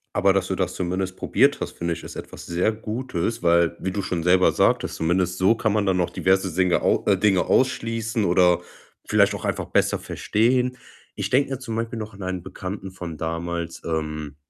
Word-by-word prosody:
Aber 95 0 +4
dass 95 -1 0
du 95 - -1
das 95 -2 -1
zumindest 95 +1 -3
probiert - - +2
hast, - - -4
finde 85 0 -1
ich, - - -8
ist - - -9
etwas - - -9
sehr 90 +5 +1
Gutes, 110 -1 -3
weil 85 -1 +3
wie 95 - -2
du 100 +1 -2
schon 85 -3 -3
selber 90 +1 +4
sagtest, - - +1
zumindest 90 +2 0
so 95 +5 +4
kann 110 -2 0
man 105 -2 +1
dann 95 -1 +2
noch 90 -2 +1
diverse 95 0 +1
Dinge 90 +1 +2
au - - +2
äh, 100 - +4
Dinge 95 -2 +3
ausschließen 115 -3 +1
oder 90 0 +4 0.4
vielleicht - - +3
auch - - -6
einfach - - -1
besser - - +1
verstehen. 125 +3 0 0.4
Ich 100 -1 -3
denke 135 +2 +2
da 135 - -3
zum 115 -4 -5
Beispiel 115 0 -3
noch 110 0 -6
an 100 - -9
einen 95 -1 -3
Bekannten 95 +1 -6
von 85 -4 -7
damals, 85 +1 -4
ähm, 75 -2 -3
95 Hz, 205 wpm, -23 LUFS, 85-110 Hz, 0.4 s, Aber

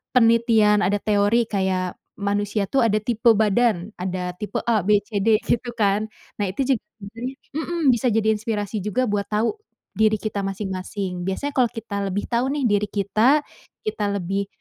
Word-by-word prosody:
penelitian 230 -3 +4
ada 205 +2 +1
teori 210 +3 +2
kayak 190 -3 -1 0.3
manusia 205 +1 0
tuh 270 - +2
ada 215 -2 +2
tipe 235 0 +3
badan 215 -2 +2
ada 180 -1 -2
tipe 210 - -6
A, 230 -3 +3
B, 210 -1 +5
C, 210 -2 -2
D 220 -1 +5
gitu 240 +1 -1
kan 210 -1 +1 0.3
nah 205 - +1
itu 235 +9 -1
juga 220 - -9 0.2
sebenarnya, 230 +6 -7 0.2
mhm, 340 +1 -2
bisa 240 +2 0
jadi 220 0 +1
inspirasi 210 -1 -3
juga 245 +4 0
buat 205 -1 0
tahu, 220 - +1 0.4
diri 215 0 +3
kita 210 -1 -3
masing-masing 190 -2 -4
biasanya 280 +9 -2
kalau 245 -2 +3
kita 205 -3 -4
lebih 195 +2 -2
tahu 235 +2 +1
nih 290 -2 -2
diri 205 0 +1
kita 215 +8 +3 0.5
kita 210 - -1
lebih, 195 +2 -2
210 Hz, 170 wpm, -23 LUFS, 200-230 Hz, 0.5 s, B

